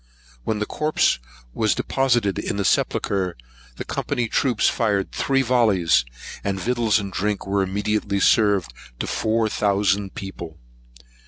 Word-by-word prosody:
When 110 Hz, -, 0 dB
the 105 Hz, -, -1 dB
corpse 155 Hz, -, +1 dB, 0.3 s
was 110 Hz, -2 st, +1 dB
deposited 120 Hz, -7 st, +1 dB
in -, -, -3 dB
the 100 Hz, -, -1 dB
sepulchre, 95 Hz, -3 st, 0 dB, 0.4 s
the -, -, -6 dB
Company's 120 Hz, -2 st, -2 dB
troops 125 Hz, -5 st, +2 dB
fired 105 Hz, -5 st, 0 dB
three 135 Hz, 0 st, +1 dB
vollies, 105 Hz, -, +3 dB, 0.4 s
and 95 Hz, -1 st, -2 dB
victuals 115 Hz, -1 st, +1 dB
and 100 Hz, -2 st, -4 dB
drink 105 Hz, +2 st, -1 dB
were 100 Hz, 0 st, 0 dB
immediately 100 Hz, +1 st, -1 dB
served 100 Hz, -, +3 dB, 0.2 s
to -, -, -3 dB
four 110 Hz, 0 st, 0 dB
thousand 100 Hz, -2 st, 0 dB
people. 85 Hz, -4 st, -7 dB
105 Hz, 135 wpm, -22 LUFS, 95-115 Hz, 0.4 s, vollies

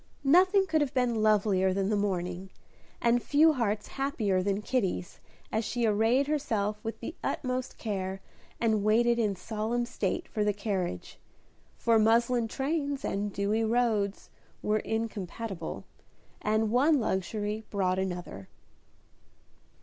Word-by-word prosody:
Nothing 370 Hz, +7 st, +5 dB
could 320 Hz, -4 st, +1 dB
have 280 Hz, -3 st, -1 dB
been 240 Hz, -3 st, +1 dB
lovelier 200 Hz, -3 st, +3 dB
than 195 Hz, 0 st, 0 dB
the 215 Hz, -, +2 dB
morning, 185 Hz, -2 st, -2 dB, 0.5 s
and 240 Hz, +1 st, +3 dB
few 310 Hz, +5 st, +4 dB
hearts 215 Hz, -5 st, -1 dB
happier 225 Hz, -9 st, 0 dB
than 200 Hz, +2 st, -1 dB
Kitty's, 195 Hz, -8 st, -2 dB, 0.3 s
as 220 Hz, +1 st, 0 dB
she 240 Hz, +2 st, -1 dB
arrayed 225 Hz, +6 st, +3 dB
herself 215 Hz, -8 st, -1 dB
with 225 Hz, -, -5 dB
the -, -, -5 dB
utmost 255 Hz, -1 st, -2 dB
care, 190 Hz, -3 st, -3 dB, 0.4 s
and 220 Hz, -3 st, +1 dB
waited 235 Hz, +3 st, +3 dB
in 210 Hz, -3 st, +1 dB
solemn 220 Hz, +5 st, -2 dB
state 200 Hz, -5 st, -2 dB
for 210 Hz, -, -1 dB
the 210 Hz, 0 st, +2 dB
carriage; 190 Hz, -, -3 dB, 0.6 s
for 230 Hz, -1 st, +3 dB
muslin 235 Hz, +2 st, +3 dB
trains 280 Hz, +2 st, -2 dB
and 205 Hz, +1 st, -2 dB
dewy 200 Hz, +3 st, 0 dB
roads 220 Hz, -3 st, 0 dB, 0.3 s
were 215 Hz, +1 st, +2 dB
incompatible, 215 Hz, -4 st, -4 dB, 0.6 s
and 215 Hz, 0 st, +1 dB
one 280 Hz, +5 st, +4 dB
luxury 210 Hz, +1 st, -2 dB
brought 185 Hz, -2 st, 0 dB
another. 175 Hz, -, -4 dB
215 Hz, 130 wpm, -29 LUFS, 200-240 Hz, 0.6 s, Nothing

